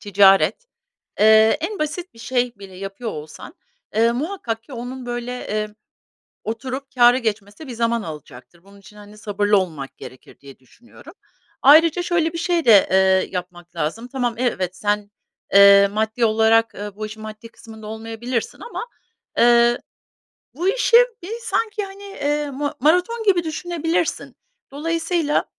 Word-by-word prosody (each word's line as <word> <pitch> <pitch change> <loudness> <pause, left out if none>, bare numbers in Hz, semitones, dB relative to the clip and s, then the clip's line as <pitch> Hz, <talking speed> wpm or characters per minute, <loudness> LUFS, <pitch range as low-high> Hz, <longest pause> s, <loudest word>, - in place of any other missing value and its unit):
ticaret. 195 - +3 0.5
Eee, 220 +2 +6
en 400 +5 -4
basit 310 +4 -4
bir - - -18
şey 245 +1 -1
bile 195 -2 -12
yapıyor 195 +4 -6
olsan, 155 - -10 0.4
eee, 230 +2 +3
muhakkak 250 - -4
ki 265 - -16
onun, 250 +1 -7
böyle, 240 0 -4 0.2
eee, 215 0 -2 0.8
oturup 255 +5 -5
kâra 245 0 +6
geçmesi 215 +2 -4
bir 250 - -6
zaman 230 0 -1
alacaktır. 155 +1 -11
Bunun 200 +1 -18
için, 200 +1 -17
hani, 210 0 -14
sabırlı 205 -1 +1
olmak 160 -8 -4
gerekir 130 - -13
diye 140 -1 -14
düşünüyorum. 240 - -17 0.5
Ayrıca 320 +5 +6
şöyle 335 -2 0
bir 335 - -4
şey 340 -1 0
de, 215 -5 +6
eee, 190 0 +3
yapmak 175 -1 -7
lazım: 170 +9 -3
Tamam, 245 -3 -2
evet, 190 -8 -1
sen, 205 0 -2 0.4
eee, 200 0 +8
maddi 220 +3 -1
olarak, 225 +1 +3
eee, 205 -1 -7
bu 215 +1 -5
işin 215 +1 -9
maddi 215 +1 -9
kısmında 220 -2 -13
olmayabilirsin 225 +2 -5
ama, 475 - -6 0.5
eee, 240 0 +4 0.8
bu 345 +7 -1
işi, 470 +2 +3 0.3
bir, 375 - -7
sanki, 430 -3 -2
hani, 390 0 -11
eee, 295 -6 -2
ma 285 +2 -3
maraton 360 - +2
gibi 365 -4 +3
düşünebilirsin. 330 0 -2 0.3
Dolayısıyla, 330 +1 -1
230 Hz, 145 wpm, -21 LUFS, 205-295 Hz, 0.8 s, eee